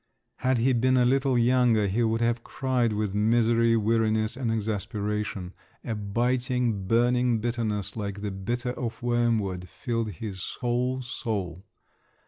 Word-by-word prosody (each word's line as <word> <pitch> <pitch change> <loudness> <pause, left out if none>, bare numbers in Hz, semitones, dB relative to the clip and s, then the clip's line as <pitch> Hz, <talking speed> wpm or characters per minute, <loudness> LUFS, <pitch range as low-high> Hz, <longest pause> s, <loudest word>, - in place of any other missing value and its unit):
Had 130 0 +1
he 125 +3 +3
been 130 +2 +3
a 125 - +4
little 135 0 +2
younger, 120 -3 +3
he 100 +5 0
would 115 0 +1
have 115 0 +1
cried 125 -4 0
with 105 -2 -1
misery, 115 +2 +3
weariness, 110 0 +1
and 125 -3 -1
exasperation: 105 -3 -3 0.3
a 115 - -3
biting, 120 0 0
burning 120 +2 +3
bitterness, 110 -3 -2
like 100 -2 -4
the 105 - -2
bitter 120 +6 -3
of 120 -2 -5
wormwood, 115 -7 0
filled 115 -4 -3
his 95 +1 -6
whole 125 +1 0
soul. 100 -7 -4
115 Hz, 135 wpm, -27 LUFS, 105-120 Hz, 0.3 s, a